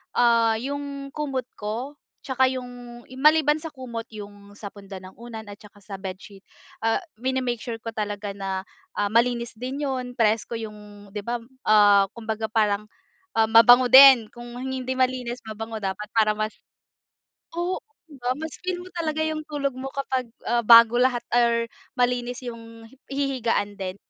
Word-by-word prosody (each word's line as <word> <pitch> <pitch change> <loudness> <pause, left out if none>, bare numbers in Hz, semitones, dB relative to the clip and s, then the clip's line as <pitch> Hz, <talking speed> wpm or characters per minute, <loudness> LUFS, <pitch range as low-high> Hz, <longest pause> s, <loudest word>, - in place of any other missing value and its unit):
ah, 230 -2 +4
yung 280 +3 -5
kumot 270 -4 -3
ko 230 +7 -4 0.3
tsaka 260 -1 +1
yung 245 -1 -8 0.2
maliban 300 +1 +4
sa 315 0 -8
kumot, 235 -4 -6
yung 205 -1 -11
sa 205 0 -8
punda 195 -2 -11
ng 185 0 -13
unan 230 -2 -8
at 205 - -9
saka 205 0 -17
sa 200 0 -8
bedsheet, 190 +1 -9 0.4
ah, 225 - +2 0.2
mini-make 255 0 -1
sure 225 0 -6
ko 230 - -5
talaga 210 -2 -4
na, 195 -1 -4 0.3
ah, 205 0 -1
malinis 235 +1 +1
din 260 +5 -5
yun, 255 -3 -3
presko 225 0 +1
yung 210 -2 -8
di 205 0 -7
ba, 240 0 -2 0.2
ah, 205 -2 +6
kumbaga 220 -1 -4
parang, 210 -2 +1 0.5
ah, 225 -1 +2
mabango 245 +2 +7
din. 260 -4 +9
Kung 240 0 -11
hindi 260 0 -3
malinis, 255 -1 -1
mabango 220 0 -6
dapat 195 +1 -3
para 215 -2 +3
mas 215 0 -2 1.0
Oo, 350 +2 -1 0.3
di 290 -4 -15
ba? 245 +1 -1
Mas 315 +2 -7
feel 365 0 -3
mo 365 - -13
talaga 315 -2 -2
yung 315 0 -2
tulog 285 -2 -1
mo 260 +1 -6
kapag, 260 -3 -2 0.2
ah, 240 +1 +1
bago 230 +1 +7
lahat 250 -2 +2
or 235 -1 +3 0.3
malinis 245 0 0
yung 230 -1 -9
hi 270 +4 -20
hihigaan 260 -7 -1
din. 185 -1 -4
235 Hz, 160 wpm, -24 LUFS, 215-260 Hz, 1.0 s, din